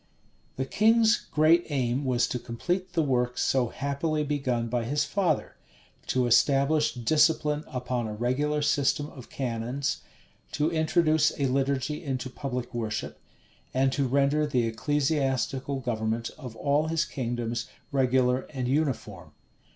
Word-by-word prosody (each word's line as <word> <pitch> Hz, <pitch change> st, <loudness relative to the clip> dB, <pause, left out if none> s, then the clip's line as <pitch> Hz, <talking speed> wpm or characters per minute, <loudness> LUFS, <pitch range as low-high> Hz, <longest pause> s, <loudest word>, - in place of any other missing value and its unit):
The 130 Hz, -, -2 dB
king's 225 Hz, +6 st, +4 dB
great 160 Hz, +3 st, +4 dB
aim 130 Hz, -1 st, 0 dB
was 125 Hz, -2 st, +2 dB
to 125 Hz, -, -2 dB
complete 180 Hz, +11 st, -3 dB
the 165 Hz, -, +2 dB
work 125 Hz, -3 st, 0 dB
so 130 Hz, -2 st, +2 dB
happily 140 Hz, +5 st, -2 dB
begun 130 Hz, -5 st, -1 dB
by 120 Hz, 0 st, -1 dB
his 145 Hz, +5 st, 0 dB
father; 180 Hz, -7 st, -1 dB, 0.5 s
to 130 Hz, -1 st, +1 dB
establish 140 Hz, +5 st, +3 dB
discipline 150 Hz, +4 st, +2 dB
upon 125 Hz, -3 st, -3 dB
a 105 Hz, -, -5 dB
regular 145 Hz, +6 st, 0 dB
system 145 Hz, +1 st, +1 dB
of 130 Hz, -3 st, -12 dB
canons, 125 Hz, +2 st, -2 dB, 0.5 s
to 150 Hz, +2 st, +1 dB
introduce 160 Hz, -1 st, +2 dB
a 140 Hz, -, +2 dB
liturgy 135 Hz, +3 st, 0 dB
into 130 Hz, -3 st, -3 dB
public 125 Hz, -3 st, -5 dB
worship, 110 Hz, -3 st, -4 dB, 0.6 s
and 135 Hz, 0 st, +3 dB
to 135 Hz, 0 st, 0 dB
render 140 Hz, +3 st, +2 dB
the 125 Hz, -5 st, +1 dB
ecclesiastical 135 Hz, +1 st, 0 dB
government 115 Hz, -1 st, -2 dB
of 125 Hz, -7 st, -9 dB
all 145 Hz, +5 st, +1 dB
his 165 Hz, +1 st, +1 dB
kingdoms 120 Hz, -2 st, -3 dB, 0.2 s
regular 130 Hz, -1 st, +2 dB
and 130 Hz, -4 st, -3 dB
uniform. 140 Hz, 0 st, -2 dB
135 Hz, 135 wpm, -27 LUFS, 125-150 Hz, 0.6 s, king's